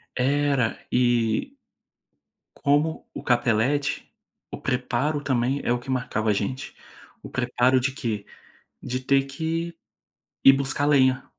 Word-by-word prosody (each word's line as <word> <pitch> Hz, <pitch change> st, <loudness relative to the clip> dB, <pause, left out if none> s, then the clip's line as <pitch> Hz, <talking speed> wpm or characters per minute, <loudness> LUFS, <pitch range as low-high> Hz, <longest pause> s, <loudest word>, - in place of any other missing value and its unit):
Era 140 Hz, -2 st, +1 dB
e 120 Hz, -, +1 dB, 1.0 s
como 150 Hz, +3 st, +1 dB
o -, -, -6 dB
capelete, 120 Hz, +3 st, +1 dB, 0.4 s
o -, -, -6 dB
preparo 130 Hz, +4 st, -1 dB
também 130 Hz, 0 st, 0 dB
é -, -, +2 dB
o 120 Hz, -, 0 dB
que 130 Hz, +2 st, -8 dB
marcava 120 Hz, -4 st, -1 dB
a -, -, +4 dB
gente. 110 Hz, +6 st, -3 dB, 0.5 s
O -, -, -9 dB
preparo 125 Hz, +1 st, +2 dB
de 130 Hz, +1 st, -1 dB
quê? 110 Hz, -6 st, -3 dB, 0.6 s
De 130 Hz, +1 st, -3 dB
ter 135 Hz, +1 st, +2 dB
que 165 Hz, +4 st, -3 dB, 0.7 s
ir 135 Hz, -, +10 dB
buscar 135 Hz, +1 st, 0 dB
lenha, 130 Hz, -3 st, +3 dB
130 Hz, 125 wpm, -25 LUFS, 120-140 Hz, 1.0 s, ir